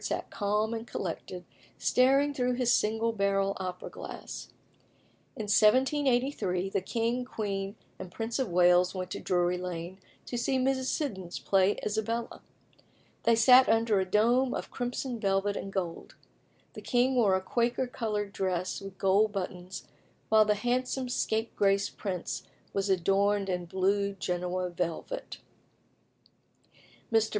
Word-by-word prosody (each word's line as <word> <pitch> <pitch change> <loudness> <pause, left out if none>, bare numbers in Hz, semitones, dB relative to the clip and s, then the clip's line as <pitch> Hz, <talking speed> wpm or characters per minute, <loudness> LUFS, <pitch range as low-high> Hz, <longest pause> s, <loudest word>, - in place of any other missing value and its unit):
sat - - -3
calm 210 +2 0
and 230 +1 -5
collected, 180 -1 -5 0.3
staring 275 +3 +3
through 250 -2 0
his 245 -1 +2
single 225 +2 +1
barrel 195 -1 +1
opera 180 -1 -5
glass. - - -8 0.9
In 220 - -4
1783 240 -3 +2
the - - 0
king, 230 +5 -1
queen, 200 -4 -4 0.2
and 180 - -8
Prince 225 +5 -3
of 260 - 0
Wales 180 +1 +4
went 185 -1 -4
to - - -4
Drury 180 0 +1
Lane 180 +1 -6 0.3
to 245 - -3
see 265 +2 +1
Mrs. 260 0 +1
Siddons 190 - -3
play 195 +1 +2
Isabella. 225 +2 -2 0.8
They 230 - +5
sat 250 +3 +7
under 225 -2 +3
a 190 - +1
dome 240 +7 +2
of - - -5
crimson 245 0 -3
velvet 200 0 +1
and 195 - -5
gold. 180 -4 -4 0.6
The - - -8
king 250 +1 +2
wore 215 -7 +4
a - - +1
Quaker 235 +5 0
coloured 210 -5 -3
dress 185 0 -2
with 195 -1 -9
gold 200 +3 +3
buttons, 185 -1 -6 0.4
while 215 0 +6
the 210 0 +2
handsome 250 +3 -1
scapegrace 205 -4 +1
prince 185 -4 -4 0.3
was 195 0 -1
adorned 195 +2 +2
in 180 -1 -2
blue 200 +3 0
Genoa 180 -1 -2
velvet. 175 - -4 1.8
Mr. 225 -1 +4
205 Hz, 135 wpm, -29 LUFS, 190-240 Hz, 1.8 s, sat